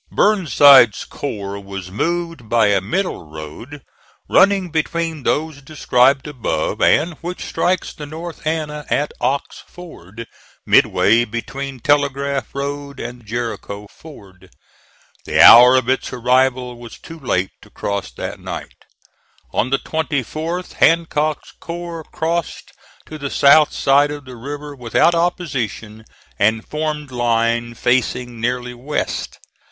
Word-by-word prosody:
Burnside's 145 Hz, -, +5 dB
corps 100 Hz, -7 st, -6 dB
was 95 Hz, -2 st, -8 dB
moved 165 Hz, -, -3 dB
by 115 Hz, -2 st, +3 dB
a 100 Hz, -2 st, +2 dB
middle 110 Hz, -, -3 dB
road 80 Hz, -, -10 dB, 0.4 s
running 190 Hz, -2 st, +3 dB
between 165 Hz, 0 st, -2 dB
those 150 Hz, +2 st, -1 dB
described 135 Hz, -2 st, +2 dB
above, 145 Hz, -6 st, -3 dB
and 165 Hz, +3 st, +3 dB
which 175 Hz, +2 st, -6 dB
strikes 180 Hz, 0 st, -1 dB
the 150 Hz, -, -9 dB
North 160 Hz, +1 st, -8 dB
Anna 150 Hz, -2 st, -2 dB
at 145 Hz, -, 0 dB
Ox 140 Hz, +1 st, -2 dB
Ford, 115 Hz, -, -11 dB, 0.4 s
midway 115 Hz, +3 st, +4 dB
between 130 Hz, +4 st, -6 dB
Telegraph 140 Hz, -1 st, 0 dB
Road 140 Hz, 0 st, -5 dB
and 120 Hz, -2 st, -8 dB
Jericho 110 Hz, -3 st, -5 dB
Ford. 95 Hz, -, -15 dB, 0.8 s
The -, -, -1 dB
hour 125 Hz, +2 st, +9 dB
of 130 Hz, -2 st, +1 dB
its 130 Hz, 0 st, -1 dB
arrival 125 Hz, 0 st, +1 dB
was 120 Hz, -1 st, -11 dB
too 165 Hz, 0 st, -12 dB
late 95 Hz, -9 st, -1 dB
to -, -, -17 dB
cross 100 Hz, -5 st, -4 dB
that -, -, -6 dB
night. -, -, -8 dB, 0.7 s
On 120 Hz, -, 0 dB
the 135 Hz, -, +2 dB
24th 160 Hz, +4 st, -3 dB
Hancock's 155 Hz, -2 st, +1 dB
corps 170 Hz, -1 st, -6 dB
crossed 165 Hz, 0 st, -3 dB, 0.3 s
to 155 Hz, -, -9 dB
the 140 Hz, -1 st, -4 dB
south 145 Hz, +2 st, +5 dB
side 140 Hz, +1 st, +3 dB
of 145 Hz, -1 st, -7 dB
the 130 Hz, -1 st, -10 dB
river 145 Hz, +4 st, -7 dB
without 125 Hz, +7 st, +2 dB
opposition, 125 Hz, -, -3 dB, 0.3 s
and 110 Hz, +2 st, +1 dB
formed 150 Hz, -2 st, -4 dB
line 120 Hz, -1 st, 0 dB
facing 125 Hz, -1 st, -1 dB
nearly 125 Hz, +1 st, -2 dB
west. 130 Hz, +5 st, -4 dB
135 Hz, 125 wpm, -19 LUFS, 120-155 Hz, 0.8 s, hour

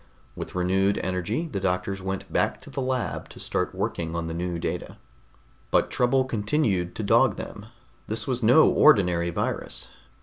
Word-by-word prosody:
With -, -, -7 dB
renewed 95 Hz, +2 st, +2 dB
energy 95 Hz, -, -2 dB
the 115 Hz, -11 st, -3 dB
doctors 95 Hz, +1 st, -1 dB
went 95 Hz, 0 st, -5 dB
back -, -, +1 dB
to -, -, -12 dB
the 135 Hz, -, -3 dB
lab 130 Hz, -1 st, -2 dB
to -, -, -12 dB
start -, -, -2 dB
working 85 Hz, -1 st, -2 dB
on 85 Hz, -1 st, -2 dB
the 80 Hz, -, -4 dB
new 85 Hz, +1 st, -2 dB
data. -, -, -4 dB, 0.7 s
But -, -, +2 dB
trouble 130 Hz, +2 st, +2 dB
continued 105 Hz, -, 0 dB
to 110 Hz, -, -3 dB
dog 100 Hz, -, +4 dB
them. 105 Hz, +1 st, -8 dB, 0.4 s
This 110 Hz, 0 st, -2 dB
was 125 Hz, -2 st, -1 dB
no 125 Hz, +8 st, +6 dB
ordinary 90 Hz, -, +4 dB
virus. 85 Hz, -, -3 dB
100 Hz, 165 wpm, -26 LUFS, 90-120 Hz, 0.7 s, no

